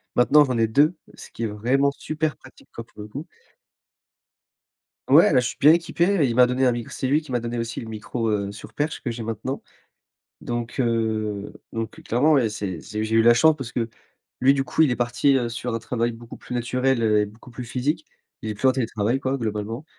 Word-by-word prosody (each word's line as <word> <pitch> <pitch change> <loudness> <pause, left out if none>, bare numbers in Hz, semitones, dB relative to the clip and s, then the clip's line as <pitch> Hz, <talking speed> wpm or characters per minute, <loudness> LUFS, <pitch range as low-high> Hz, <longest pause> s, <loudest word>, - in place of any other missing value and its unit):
Maintenant 145 +5 +6
j'en 130 -3 -1
ai 115 -1 +3
2, 150 +9 +3 0.2
ce - - -12
qui 115 - -6
est - - +1
vraiment 125 +7 +1
super 155 +1 -3
pratique, 130 - -18
quoi, 115 - -7
pour 110 - -13
le 105 - -8
coup. 140 - -8 1.8
Ouais, - - +7
là, - - +6
je 125 - 0
suis - - -6
bien 150 +3 +7
équipé, 170 0 0 0.2
et - - +5
il 115 - -2
m'a 125 0 +7
donné 125 +1 +1
un - - +4
mic 120 -1 -4
c'est 130 - -3
lui 150 +4 +2
qui 150 - -12
m'a 120 - +1
donné 120 +1 -4
aussi 115 +1 -4
le 115 - -8
micro, 110 +1 -3
heu, 100 -2 -1
sur 100 - -11
perche 150 +1 -2
que 125 - -3
j'ai 115 -1 -6
maintenant. 115 +5 -4 0.8
Donc, 120 +1 -4
heu, 110 -4 -1 0.2
donc, 115 -1 -5
heu, - - -12
clairement 145 +7 +3
ouais, 120 -5 +3
c'est 100 -5 -4
c'est 105 0 -5
j'ai 110 +1 0
eu 115 - +6
la 120 +1 +7
chance 155 +5 +5
parce 125 -3 -7
que, 115 -2 -1 0.5
lui, 135 +2 +6
du 135 -1 0
coup, 160 - +2
il 150 - +4
est 120 - 0
parti, 125 +3 +2
heu, 120 -2 0
sur 120 0 -4
un - - 0
travail 115 0 -2
beaucoup 115 +1 -11
plus - - -8
naturel 125 +1 0
et 105 -1 +3
beaucoup 110 +4 -15
plus 125 +1 -7
physique. 145 +7 -2 0.4
Il 110 - -3
est - - -3
plus 130 +6 +2
en - - +5
télétravail 115 -1 -1
quoi, 135 0 -2
globalement 110 +3 -4
120 Hz, 235 wpm, -23 LUFS, 115-135 Hz, 1.8 s, Ouais